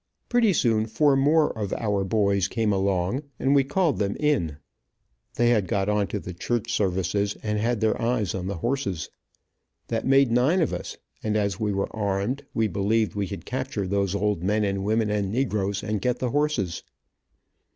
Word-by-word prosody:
Pretty 240 -4 +4
soon 115 - +2
four 140 +5 +3
more 150 +3 +3
of 105 -3 -3
our 105 -3 0
boys 100 -1 +1
came 110 -2 0
along, 95 +5 0 0.2
and 135 +1 +2
we 140 -1 +5
called 155 +2 0
them 100 -1 -1
in. 130 - +1 0.8
They 120 0 +3
had 105 -5 +2
got 100 +2 0
on 105 -1 +1
to 105 - -3
the 90 - -7
church 120 +6 -2
services, 100 0 0
and 105 -1 -1
had 115 0 0
their 110 -1 +1
eyes 115 -6 0
on 95 -1 -4
the 100 - -3
horses. 100 - -2 0.8
That 115 +1 -1
made 135 -2 +4
nine 130 +10 +3
of 165 - +1
us, - - -5 0.2
and 110 0 0
as 100 -3 -1
we 105 -1 0
were 100 +2 -2
armed, 105 +6 -1
we 115 -1 +1
believed 100 +1 0
we 100 -1 -2
could 100 - -7
capture 130 -6 -3
those 100 0 0
old 105 -3 0
men 105 +4 +1
and 100 -1 -1
women 110 +1 +1
and 100 -2 -1
negroes, 100 -5 -1
and 105 -2 -2
get 125 +2 0
the 125 -2 -2
horses. 140 - 0
105 Hz, 185 wpm, -25 LUFS, 100-125 Hz, 0.8 s, we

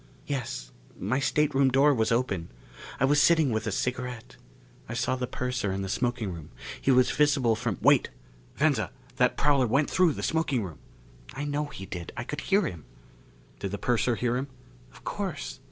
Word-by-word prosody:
"Yes. 120 - -4 0.3
My 115 +8 0
stateroom 140 -2 +2
door 140 +3 +5
was 110 -3 +1
open. 100 -8 0 0.5
I 135 - +4
was 145 +2 +4
sitting 160 -6 +4
with 110 0 -1
a - - 0
cigarette. 125 - -3 0.5
I 120 - -4
saw 125 +1 0
the 125 -1 -3
purser 125 -4 -2
in 95 +1 -2
the 95 - -4
smoking 120 -3 -1
room. 80 -3 -9 0.3
He - - 0
was 130 -1 +5
visible 140 -6 +3
from 110 -4 -2
" - - -25
"Wait! - - +5 0.5
Venza, - - +2 0.3
that - - +3
prowler 140 -3 +3
went 140 +6 +2
through 180 -4 +4
the - - -6
smoking 155 -8 +1
room!" 85 -6 -8 0.6
"I 145 +2 -3
know 145 +1 -1
he 95 -9 -8
did. 85 -3 -7
I 120 - -2
could 150 - -5
hear 200 +1 +2
him." 85 - -6 0.7
"Did 100 - -3
the 100 - -4
purser 120 +2 +1
hear 120 +1 0
him?" 135 +2 -3 0.4
"Of - - -17
course. - - -4
125 Hz, 185 wpm, -28 LUFS, 110-140 Hz, 0.7 s, door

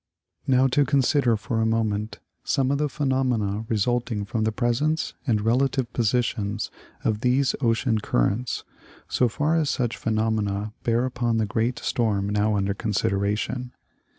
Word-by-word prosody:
Now 130 0 +4
to 145 +3 +3
consider 135 -3 +2
for 115 +1 -2
a - - +2
moment 110 -1 -1 0.3
some 135 -1 +1
of 140 - 0
the 150 -1 +1
phenomena 125 -8 0
result 120 +3 0
ing 105 -2 -2
from 110 +1 -1
the 110 - +1
presence 125 +8 0
and 110 -4 +3
relative 125 +2 +1
positions 110 -3 0 0.3
of 110 -1 0
these 130 +1 +2
ocean 115 -2 +2
cur - - +2
rents, 120 +5 -3 0.4
so 125 - +2
far 150 +7 +1
as 155 -3 +1
such 120 -3 -1
phenomena 110 -2 -1
bear 120 +1 +1
upon 120 -2 0
the 110 - +1
great 115 +4 -1
storm 105 -4 0
now 105 +1 +1
under 100 0 0
consideration. 105 +4 -1
115 Hz, 150 wpm, -25 LUFS, 105-125 Hz, 0.4 s, Now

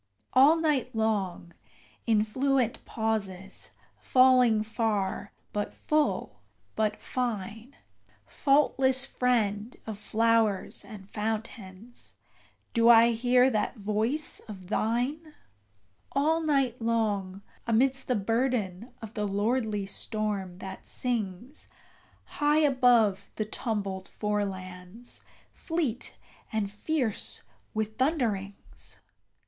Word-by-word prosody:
All 280 +5 +7
night 305 -8 0
long, 200 -6 -1 0.5
in 215 -2 +4
fluent 255 +1 0
pauses, 200 -4 -3 0.3
falling 255 -4 +5
far, 210 -3 -1 0.2
but 205 0 -2
full, 305 -1 0 0.4
but 215 -1 0
fine, 230 0 -4 0.5
Faultless 270 -2 +2
friend 230 -4 0
of 215 -2 -6
flowers 225 -2 +1
and 195 -3 -11
fountains, 215 0 -5 0.6
do 230 0 +5
I 235 0 +8
hear 250 +2 +4
that 215 +2 0
voice 220 +9 0
of 190 -4 -9
thine 260 +9 -1 0.8
All 315 +4 +2
night 275 -6 +1
long, 205 -4 0 0.2
amidst 260 +4 +2
the 250 - +2
burden 225 -1 -1
of 220 0 -7
the 210 -2 -1
lordly 210 0 0
storm, 200 -3 -2
that 190 0 -8
sings 235 +1 -3 0.6
High 295 +1 +2
above 245 -8 +4
the 215 - -1
tumbled 200 -4 -3
forelands, 195 +1 -4 0.3
fleet 300 -8 -2 0.3
and 210 -2 -1
fierce 245 +1 -1 0.3
with 220 +1 -2
thunderings! 225 - -2
225 Hz, 95 wpm, -28 LUFS, 205-255 Hz, 0.8 s, I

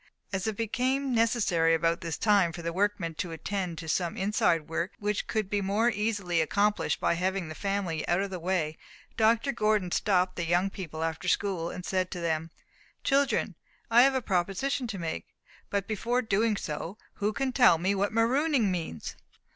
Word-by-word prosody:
As 190 +2 -1
it 215 -2 -2
became 255 +4 0
necessary 210 -8 +3
about 165 +1 +1
this 165 -3 -3
time 200 -6 +3
for 170 - -7
the 170 0 -2
workmen 195 -3 0
to 180 - -2
attend 180 +1 -3
to 160 - -7
some 170 +1 -1
inside 180 -5 +1
work, 170 +3 -2
which 210 -2 -2
could 215 -3 -1
be 205 +1 0
more 210 +5 +2
easily 200 -6 0
accomplished 205 +6 +1
by - - +2
having 185 0 -1
the - - -5
family 195 -3 -2
out 175 - +2
of 200 0 -2
the 185 - -4
way, 165 -3 -1 0.4
Dr. 230 +4 +3
Gordon 215 -6 +1
stopped 185 -2 +1
the 170 - -1
young 180 +3 +2
people 160 -5 -5
after 165 +2 -3
school, 180 -3 0
and 180 0 -7
said 185 -1 0
to 180 - -5
them: 165 -1 -1 0.5
"Children, 275 0 +2 0.4
I 235 +1 +8
have 270 +1 +5
a 260 - 0
proposition 200 +8 0
to 215 -4 -5
make. 165 -2 -4 0.4
But 200 -1 -1
before 235 +4 0
doing 215 0 +1
so, 165 +5 -5 0.2
who 210 +1 0
can 265 +3 -1
tell 245 -9 +6
me 185 +4 +1
what 200 +1 0
'marooning' 240 0 +2
means?" 165 - -4
195 Hz, 185 wpm, -28 LUFS, 170-220 Hz, 0.5 s, I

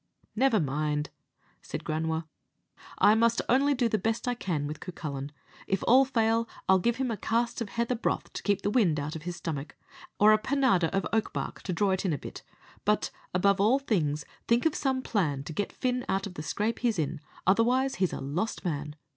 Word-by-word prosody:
"Never 240 -2 +3
mind," 150 0 -1 0.5
said - - -6
Granua, 160 +1 -1 0.7
"I 210 - +6
must 230 +1 +3
only 275 +3 +3
do 245 -2 +2
the 215 -1 0
best 225 +5 -1
I 245 - +2
can 170 -11 -2
with 150 +1 -5
Cucullin. 145 -6 -6 0.4
If 195 -1 0
all 260 +3 +7
fail, 230 -3 +1 0.2
I'll 190 0 +5
give 235 +6 +1
him 255 -1 -1
a 220 - -2
cast 235 +3 -1
of 220 - -3
heather 235 +3 -1
broth 235 - -2
to - - -5
keep 205 -2 0
the 205 - +1
wind 185 -11 +3
out 150 +2 -4
of 160 - -5
his 175 +2 -5
stomach, 160 -5 -5 0.4
or 215 +1 +7
a 215 - +4
panada 255 -8 +2
of 195 - -1
oak 220 -1 +1
bark - - -4
to 190 - -4
draw 195 +3 +1
it 190 - 0
in 185 -5 +1
a - - -1
bit; - - -9 0.4
but, - - +1 0.2
above 195 +2 +3
all 225 +6 +5
things, 155 - -1 0.2
think 235 +4 +3
of 320 - +3
some 265 -3 -1
plan 150 - 0
to 160 - -7
get 205 +5 -2
Fin 250 -1 -1
out 195 +1 0
of 200 - -7
the 165 - -6
scrape 210 +8 -1
he's 235 -4 +1
in, 155 -1 -2 0.2
otherwise 245 +7 +3
he's 185 - +3
a - - -4
lost 175 +11 -3
man. 150 -3 -3
200 Hz, 210 wpm, -28 LUFS, 160-235 Hz, 0.7 s, all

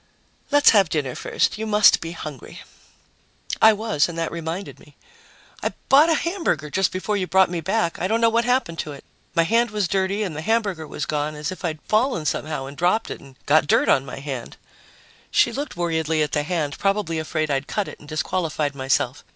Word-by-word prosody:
"Let's 290 0 +6
have 200 -6 +4
dinner 145 -6 -1
first. 210 - -1
You 220 - -3
must 210 -1 +5
be 165 0 -5
hungry." 150 -6 -9 1.0
I 220 - +9
was, 210 -8 0
and 170 - -7
that 165 -1 -2
reminded 170 +3 -5
me: - - -19 0.7
"I - - -2 0.2
bought 295 +5 +6
a 325 - +4
hamburger 320 - -1
just 190 +2 +1
before 205 +3 -2
you 185 -2 -2
brought 190 +1 +4
me 170 -2 -2
back. 190 0 -1
I 185 - +1
don't 225 +3 +1
know 230 - +4
what 230 +1 +2
happened 245 -9 0
to 150 - -4
it. 140 - -12 0.3
My 165 - +4
hand 230 +7 +2
was 210 -3 -1
dirty 195 +3 0
and 180 -7 -4
the 155 - -4
hamburger 200 -5 -1
was - - -4
gone, 150 0 -2
as 150 +2 -4
if 185 - -9
I'd 160 -3 -2
fallen 215 - +1
somehow 150 -2 -2
and 140 +1 -9
dropped 180 +8 +1
it - - -7
and 135 -1 -15
got 150 +1 +4
dirt - - +3
on 135 - +4
my - - -8
hand." 135 -4 -6 0.7
She 235 - +3
looked 280 -4 -5
worriedly 160 -2 0
at 150 - -3
the 150 - +1
hand, 150 -2 -2
probably 195 -5 0
afraid 155 -1 -2
I'd 140 0 -1
cut 210 -2 -2
it - - -10
and 145 - -15
disqualified 155 -1 -1
myself. 135 -1 -1
170 Hz, 210 wpm, -23 LUFS, 150-210 Hz, 1.0 s, I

